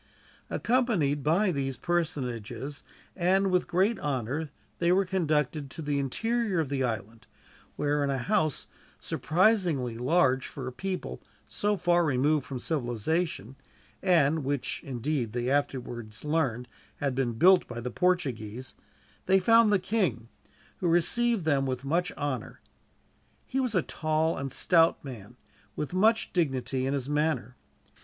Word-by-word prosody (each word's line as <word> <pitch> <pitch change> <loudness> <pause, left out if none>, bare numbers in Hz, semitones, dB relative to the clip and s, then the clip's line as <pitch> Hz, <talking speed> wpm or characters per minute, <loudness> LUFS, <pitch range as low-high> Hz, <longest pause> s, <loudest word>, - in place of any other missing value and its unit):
Accompanied 215 - +1
by 180 +7 +2
these 135 -4 -2
personages, 135 -5 -3 0.3
and 190 +2 +2
with 180 -1 +2
great 195 +5 +1
honor, 145 +2 -2 0.3
they 170 0 +3
were 190 +2 +3
conducted 155 -6 0
to 160 - -8
the 145 -1 0
interior 225 - 0
of 155 -5 -1
the 135 -2 -1
island; 115 -2 -4 0.5
where, 145 0 0
in 140 - 0
a 135 - 0
house 155 - 0 0.3
surprisingly 170 - +1
large 130 -1 +2
for 135 - -7
a 130 - -4
people 185 +8 -5 0.3
so 205 0 0
far 175 -1 +3
removed 145 0 +1
from 135 - -4
civilization, 135 - -2 0.5
and 160 -5 +3
which, 140 0 -2
indeed, 130 -2 -2
they 120 +1 -1
afterwards 120 -5 -2
learned 135 -6 0 0.3
had 140 -2 -1
been 125 -2 0
built 180 +10 +5
by 120 -1 -6
the 125 +1 -4
Portuguese, 130 - -1 0.5
they 190 +1 +5
found 230 +2 +5
the 205 - +5
king, 185 - -1 0.5
who 180 - -1
received 195 +5 +2
them 140 -3 +2
with 130 +1 -3
much 170 +5 0
honor 140 -5 -4 0.9
He 265 - -2
was 250 -5 -1
a 180 - +3
tall 155 +1 0
and 135 -1 -4
stout 165 +2 +3
man, 120 -3 -9 0.4
with 150 - -4
much 220 +5 +2
dignity 135 -5 0
in 140 - 0
his 135 -2 -3
manner. 150 -4 -1
150 Hz, 140 wpm, -28 LUFS, 130-180 Hz, 0.9 s, built